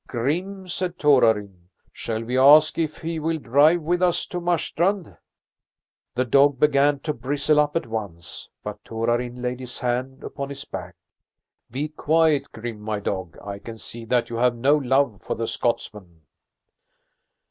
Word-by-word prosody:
"Grim," 180 Hz, +10 st, -2 dB
said 180 Hz, 0 st, -3 dB
Torarin, 110 Hz, -, +2 dB, 0.2 s
"shall 110 Hz, 0 st, -4 dB
we 125 Hz, +2 st, -3 dB
ask 150 Hz, +5 st, +6 dB
if 155 Hz, -2 st, -1 dB
he 165 Hz, 0 st, -4 dB
will 160 Hz, +1 st, -1 dB
drive 150 Hz, +5 st, +3 dB
with 175 Hz, +3 st, 0 dB
us 180 Hz, -2 st, +2 dB
to 180 Hz, -, -5 dB
Marstrand?" 175 Hz, +2 st, 0 dB, 1.0 s
The 130 Hz, +1 st, +1 dB
dog 140 Hz, +2 st, +4 dB
began 145 Hz, 0 st, +4 dB
to 150 Hz, -, -2 dB
bristle 145 Hz, +4 st, +1 dB
up 150 Hz, 0 st, +1 dB
at 165 Hz, -, 0 dB
once, 100 Hz, -7 st, -6 dB
but -, -, -7 dB
Torarin 120 Hz, +2 st, -2 dB
laid 125 Hz, 0 st, -2 dB
his 125 Hz, -1 st, -7 dB
hand 130 Hz, +2 st, -2 dB
upon 140 Hz, 0 st, -5 dB
his 140 Hz, 0 st, -7 dB
back. 90 Hz, -2 st, -7 dB, 0.7 s
"Be 140 Hz, +6 st, -3 dB
quiet, 155 Hz, -1 st, +2 dB
Grim, 115 Hz, -1 st, -6 dB
my 105 Hz, -1 st, -3 dB
dog! 95 Hz, -4 st, -4 dB
I 100 Hz, -1 st, -6 dB
can 115 Hz, +2 st, -9 dB
see 115 Hz, +1 st, -7 dB
that 120 Hz, +1 st, 0 dB
you 115 Hz, -, -3 dB
have 125 Hz, 0 st, +2 dB
no 135 Hz, +5 st, +3 dB
love 130 Hz, -, +1 dB
for -, -, -3 dB
the 115 Hz, -, -2 dB
Scotsmen." 105 Hz, -6 st, -3 dB
130 Hz, 160 wpm, -23 LUFS, 115-150 Hz, 1.0 s, ask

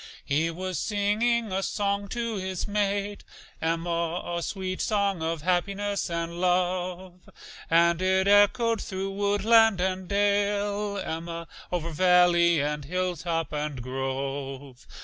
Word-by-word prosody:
He 155 Hz, +4 st, +1 dB
was 180 Hz, 0 st, -4 dB
singing 215 Hz, +2 st, +1 dB
a 190 Hz, +1 st, 0 dB
song 200 Hz, 0 st, -1 dB
to 230 Hz, +2 st, -3 dB
his 185 Hz, 0 st, -3 dB
mate, 205 Hz, 0 st, -1 dB, 0.4 s
Emma, 170 Hz, +1 st, -1 dB, 0.2 s
A 170 Hz, -, -2 dB
sweet 185 Hz, +1 st, -3 dB
song 200 Hz, -4 st, 0 dB
of 160 Hz, -1 st, -2 dB
happiness 200 Hz, +3 st, 0 dB
and 170 Hz, +1 st, -3 dB
love, 180 Hz, 0 st, -1 dB, 0.4 s
And 170 Hz, +1 st, +4 dB
it 190 Hz, +1 st, +2 dB
echoed 220 Hz, +3 st, +4 dB
thro' 190 Hz, 0 st, -4 dB
woodland 205 Hz, +1 st, +4 dB
and 185 Hz, 0 st, -1 dB
dale, 205 Hz, 0 st, 0 dB
Emma, 170 Hz, -2 st, -5 dB, 0.2 s
Over 170 Hz, -2 st, -2 dB
valley 175 Hz, -1 st, +4 dB
and 150 Hz, 0 st, -2 dB
hilltop 170 Hz, -1 st, -2 dB
and 150 Hz, -2 st, -3 dB
grove. 135 Hz, +1 st, -5 dB
185 Hz, 120 wpm, -27 LUFS, 165-200 Hz, 0.4 s, And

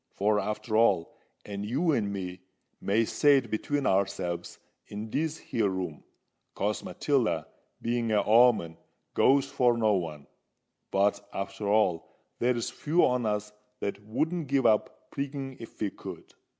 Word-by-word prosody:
For, 105 Hz, +1 st, +2 dB
arter 105 Hz, +1 st, -3 dB
all—and 100 Hz, -1 st, 0 dB
you 140 Hz, +11 st, +1 dB
and 105 Hz, -8 st, 0 dB
me 90 Hz, -2 st, -5 dB, 0.4 s
may 110 Hz, +3 st, +2 dB
say 145 Hz, +5 st, +4 dB
it 125 Hz, -5 st, -3 dB
between 140 Hz, +6 st, -1 dB
ourselves 95 Hz, -3 st, -1 dB, 0.3 s
in 105 Hz, +2 st, -6 dB
this 160 Hz, +1 st, -1 dB
here 110 Hz, -4 st, -1 dB
room, 90 Hz, -5 st, -4 dB, 0.5 s
'cause 105 Hz, +2 st, -1 dB
Matilda, 115 Hz, -, 0 dB, 0.4 s
being 120 Hz, -1 st, 0 dB
a 105 Hz, -2 st, +3 dB
o'oman, 110 Hz, -8 st, +5 dB, 0.4 s
goes 135 Hz, +1 st, +4 dB
for 125 Hz, -4 st, +2 dB
no 110 Hz, -2 st, +3 dB
one,—but, 90 Hz, +4 st, -3 dB
arter 95 Hz, +1 st, -4 dB
all, 100 Hz, -5 st, +1 dB, 0.2 s
there's 120 Hz, -1 st, 0 dB
few 165 Hz, +4 st, +2 dB
on 125 Hz, -2 st, +1 dB
us 105 Hz, 0 st, -2 dB, 0.3 s
that 100 Hz, 0 st, -4 dB
wouldn't 155 Hz, +9 st, -1 dB
give 135 Hz, -1 st, +1 dB
up 110 Hz, -2 st, +1 dB
prigging 140 Hz, -1 st, -4 dB
if 115 Hz, -, -11 dB
we 105 Hz, -2 st, -1 dB
could. -, -, -10 dB
110 Hz, 135 wpm, -28 LUFS, 100-125 Hz, 0.5 s, o'oman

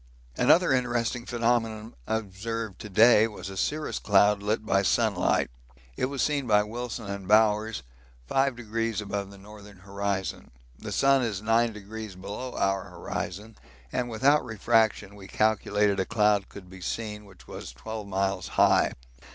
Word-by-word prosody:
Another 175 Hz, -, +4 dB
interesting 120 Hz, -1 st, -1 dB
phenomenon 115 Hz, -2 st, -1 dB
observed 110 Hz, 0 st, -4 dB
to 105 Hz, -, -8 dB
day 110 Hz, +2 st, +6 dB
was 105 Hz, -3 st, -8 dB
a -, -, -8 dB
cirrus 150 Hz, +10 st, -2 dB
cloud 105 Hz, 0 st, +4 dB
lit 105 Hz, +2 st, -1 dB
by 100 Hz, -2 st, +2 dB
sunlight. 95 Hz, -, +1 dB, 0.4 s
It -, -, 0 dB
was 135 Hz, 0 st, -2 dB
seen 145 Hz, -4 st, 0 dB
by 105 Hz, -2 st, +4 dB
Wilson 115 Hz, +1 st, -5 dB
and 100 Hz, -1 st, -6 dB
Bowers 105 Hz, -, +3 dB, 0.4 s
5° 115 Hz, -5 st, -1 dB
above 100 Hz, -1 st, -4 dB
the 100 Hz, -, -13 dB
northern 105 Hz, 0 st, -13 dB
horizon 100 Hz, 0 st, -4 dB, 0.3 s
the -, -, -7 dB
sun 135 Hz, -1 st, +3 dB
is 105 Hz, -5 st, -2 dB
9° 110 Hz, -3 st, -1 dB
below 105 Hz, +7 st, -6 dB
our 95 Hz, -1 st, 0 dB
horizon, 105 Hz, +5 st, -6 dB, 0.4 s
and 120 Hz, -1 st, -2 dB
without 135 Hz, +6 st, +3 dB
refraction 110 Hz, -2 st, +1 dB
we 100 Hz, -1 st, -12 dB
calculate 105 Hz, -2 st, +1 dB
a -, -, +2 dB
cloud 105 Hz, -2 st, +2 dB
could 95 Hz, -2 st, -11 dB
be 95 Hz, 0 st, -12 dB
seen 105 Hz, +2 st, -4 dB
which 95 Hz, -3 st, -17 dB
was -, -, -8 dB
12 105 Hz, -, -7 dB
miles 95 Hz, -1 st, -1 dB
high. -, -, +4 dB
105 Hz, 145 wpm, -27 LUFS, 100-115 Hz, 0.4 s, day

